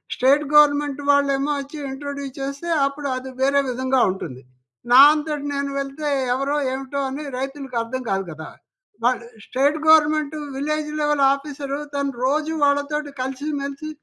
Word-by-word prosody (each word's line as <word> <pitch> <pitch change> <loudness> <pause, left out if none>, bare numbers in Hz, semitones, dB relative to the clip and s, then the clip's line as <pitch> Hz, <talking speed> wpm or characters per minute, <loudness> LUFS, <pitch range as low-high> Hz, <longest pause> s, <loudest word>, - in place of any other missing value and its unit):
State 275 +4 +4
government 290 -1 +4
వాళ్ళేమో 280 0 +2
వచ్చి 280 +3 -10
introduce 280 -1 -6
చేస్తే 280 +5 -4 0.2
అప్పుడు 280 0 -5
అది 260 +1 -7
వేరే 280 +1 +3
విధంగా 260 +1 +1
ఉంటుంది. 130 -9 -7 0.5
నా 255 - +9
అంతట 300 -1 -3
నేను 280 0 -2
వెళ్తే 275 +2 -3 0.2
ఎవరో 275 +3 -1 0.2
ఏమిటో 270 +1 -4
అని 280 +3 -5
రైతులకు 270 -1 -5
అర్థం 255 +3 -4
కాదు 195 0 0
కదా! 160 +1 -8 0.6
వాళ్ళు 245 -1 +2 0.2
state 285 +4 +1
government 310 -1 +4 0.2
village 300 +1 -2
level 295 -2 +2
officer 280 0 -5 0.2
తను 280 -1 -1
రోజు 305 +3 0
వాళ్ళతోటి 285 +1 0
కలిసి 265 +3 -4
మెలిసి 280 +2 -5
280 Hz, 140 wpm, -22 LUFS, 270-295 Hz, 0.6 s, నా